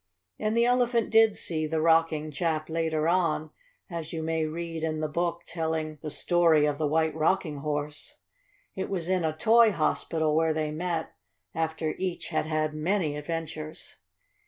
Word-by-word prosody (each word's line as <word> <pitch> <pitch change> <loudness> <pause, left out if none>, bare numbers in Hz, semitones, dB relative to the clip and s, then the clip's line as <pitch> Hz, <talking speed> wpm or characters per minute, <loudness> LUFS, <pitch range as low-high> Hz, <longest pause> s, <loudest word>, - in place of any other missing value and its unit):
And 215 +1 0
the 235 - +4
Elephant 245 -2 +2
did 225 -1 +5
see 155 -2 -2
the 160 +1 -1
Rocking 160 -1 +2
chap 155 +1 -1
later 160 -1 0
on, 165 -3 +1 0.4
as 165 -4 -6
you 160 -1 -4
may 160 0 0
read 165 0 -5
in 155 -1 -1
the 155 - -1
book 170 +2 -2
telling 160 -2 -3
"The 155 - -4
Story 165 -2 +3
of 145 0 -1
the 155 - +1
White 160 +1 +1
Rocking 160 0 0
Horse." 150 +1 -4 0.6
It - - -3
was 175 -4 -3
in 185 -1 +1
a 155 -1 -1
Toy 225 +5 +5
Hospital 160 -2 0
where 160 0 +2
they 155 -1 -1
met, 165 +1 -2 0.4
after 160 -1 -1
each 185 -2 -3
had - - -1
had 155 -1 0
many 155 0 0
adventures. 155 0 -6
160 Hz, 165 wpm, -28 LUFS, 155-170 Hz, 0.6 s, did